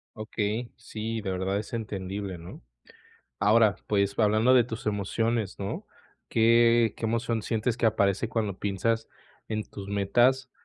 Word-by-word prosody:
Okey, 110 +1 -3
sí, 110 +1 -5
de 100 -3 -3
verdad 95 +1 -1
es 105 - -7
entendible, 100 -4 -4
¿no? 85 -4 -11 0.8
Ahora, 105 +1 +4
pues, 100 -1 +1
hablando 110 +3 +4
de 125 -2 +6
tus 115 -1 -7
emociones, 105 +1 -1
¿no? 100 0 -4 0.4
¿Qué 115 0 +4
qué - - -4
emoción 115 0 -1
sientes 115 +2 -1
que 120 - 0
aparece 100 0 +1
cuando 105 -4 -2
piensas 110 +3 -1 0.4
en 110 -1 -2
tus 100 -1 -9
metas 120 +6 +2
110 Hz, 140 wpm, -27 LUFS, 100-115 Hz, 0.8 s, de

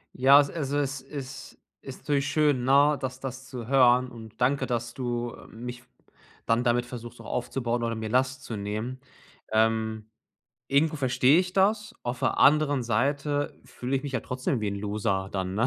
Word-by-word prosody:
Ja, 135 +2 +5
a - - +11
also 145 -1 -1
es 140 -1 -2
is 135 -1 -8 0.3
ist 135 - -8
natürlich 140 -2 0
schön, 145 -4 +2
ne, 140 +2 +5
das 130 -1 -4
das 130 0 -6
zu 120 -3 -7
hören 125 -1 +4
und 110 -1 -12
danke, 135 +3 +2
dass 120 -1 -2
du, 120 -2 -3
äh, - - -13
mich 125 +2 -8 0.6
dann 115 +1 +2
damit 120 0 +2
versuchst, 120 -1 -9
auch - - -13
aufzubauen 120 -1 -2
oder 115 -1 -1
mir 110 -1 -4
Last 130 +1 +1
zu 115 - -5
nehmen. 110 +6 -4 0.5
Ähm, 110 0 +1 0.6
irgendwo 155 +3 +2
verstehe 130 +2 +4
ich 180 0 0
das, 210 +3 +1
auf 120 0 -3
der - - 0
anderen 145 -2 +4
Seite 140 +5 0
fühle 130 +2 -3
ich 130 - -3
mich 140 -1 -5
ja 130 - 0
trotzdem 130 -1 -2
wie 105 - -1
'n 100 - -3
Loser 100 -2 -1
dann, 95 -1 -2
ne? 115 +5 +2
125 Hz, 185 wpm, -27 LUFS, 115-140 Hz, 0.6 s, a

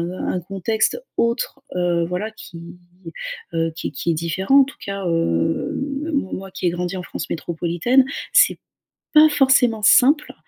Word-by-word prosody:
un 185 - -3
contexte 195 +4 -1 0.2
autre, 235 +3 -1 0.2
heu, 175 -1 +1
voilà, 180 +5 -3
qui 175 -5 -11 1.0
heu, 165 0 0
qui 165 - -4
qui 170 - -2
est - - -1
différent, 185 - +2
en - - +3
tout 275 - -12
cas 200 -1 -4
heu, 85 - 0 0.3
m 330 - -4
mo 275 -9 -1
moi 195 0 -6
qui 185 - -3
ai - - +3
grandi 175 +1 -3
en 180 - -5
France - - -6
métropolitaine, 175 +10 +1 0.3
c'est - - +5 0.6
pas 310 0 +7
forcément 265 -6 +3
simple, 285 +8 +4
190 Hz, 160 wpm, -21 LUFS, 170-245 Hz, 1.0 s, pas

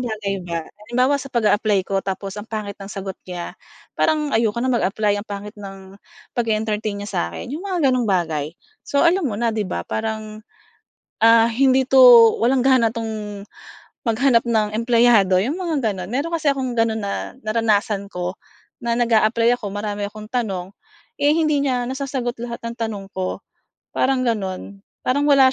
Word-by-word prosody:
bagay 210 -5 -3
ba. 165 -1 -3
Halimbawa 250 - -1
sa 275 - -8
pag-a-apply 210 -5 +2
ko 195 0 -1
tapos 195 0 -4
ang 215 - -12
pangit 215 -2 -4
ng 195 - -8
sagot 195 -1 -5 0.2
niya, 175 -1 -5 0.4
parang 305 -2 0
ayoko 225 -1 +1
na 260 - +1
mag-apply 210 -2 +1
ang 215 - -13
pangit 205 0 -6
ng 195 -1 -10 0.4
pag-e-entertain 215 -2 -1
niya 205 +1 -6
sa'kin, 85 - -3
yung 310 - -4
mga 370 -6 -2
ganong 245 -4 0
bagay. 160 -4 -1 0.2
So 280 - +1
alam 345 -2 +3
mo 205 - -4
na 235 0 0
'di 215 -3 -2
ba 85 - -3
parang, 215 -1 -4 0.8
ah, 230 0 +7
hindi 260 +2 +3
'to 265 0 +5 0.4
walang 250 +2 +2
gana 255 -4 +4
'tong 215 -3 -5 0.6
maghanap 235 +1 +3
ng 215 -3 0
empleyado, 230 -5 +4
yung 250 - -1
mga 340 -5 -2 0.2
ganon. 185 +3 -7
Meron 315 +6 -1
kasi 310 -3 +2
akong 260 -3 -3
ganon 225 -1 +1
na 200 +5 -5
naranasan 215 -3 0
ko 180 +1 -4 0.5
na 235 0 0
nag-a-apply 230 0 +3
ako, 210 -5 -6
marami 205 0 -4
akong 215 0 -10
tanong, 200 -6 -3 0.5
eh 290 - +5
hindi 305 -3 +2
niya 250 -3 0
nasasagot 260 -2 -3
lahat 235 -1 -5
ng 230 - -6
tanong 220 -4 -4
ko, 185 -1 -3 0.5
parang 260 -1 +1
ganon, 200 -3 -3 0.2
parang 285 +3 +1
wala 270 -2 +6
225 Hz, 165 wpm, -21 LUFS, 200-255 Hz, 0.8 s, ah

